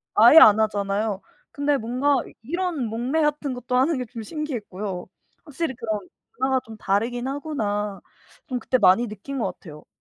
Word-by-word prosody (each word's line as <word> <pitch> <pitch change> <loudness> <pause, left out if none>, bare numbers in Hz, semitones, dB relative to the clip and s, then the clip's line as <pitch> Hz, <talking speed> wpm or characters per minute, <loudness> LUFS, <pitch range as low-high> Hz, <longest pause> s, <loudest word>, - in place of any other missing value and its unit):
아예 240 +9 +8
안 215 -6 +8
하잖아요. 205 -1 0 0.3
근데 285 0 +1
뭔가 255 +5 +1 0.2
이런 345 +2 -2
목례 245 +8 -1
같은 295 -2 0
것도 250 0 -2
하는 280 +4 +2
게 250 - -3
좀 230 -1 -8
신기했고요. 210 - -5 0.4
'확실히 300 -2 -3
그런 220 -3 -3 0.4
문화가 265 0 +2
좀 220 -1 -11
다르긴 235 +6 -1
하구나.' 210 -9 -3 0.5
좀 250 -2 -2
그때 255 +3 +1
많이 210 +3 +4
느낀 215 +7 -6
것 - - -1
같아요. 150 -4 -12
245 Hz, 325 characters per minute, -24 LUFS, 210-280 Hz, 0.5 s, 아예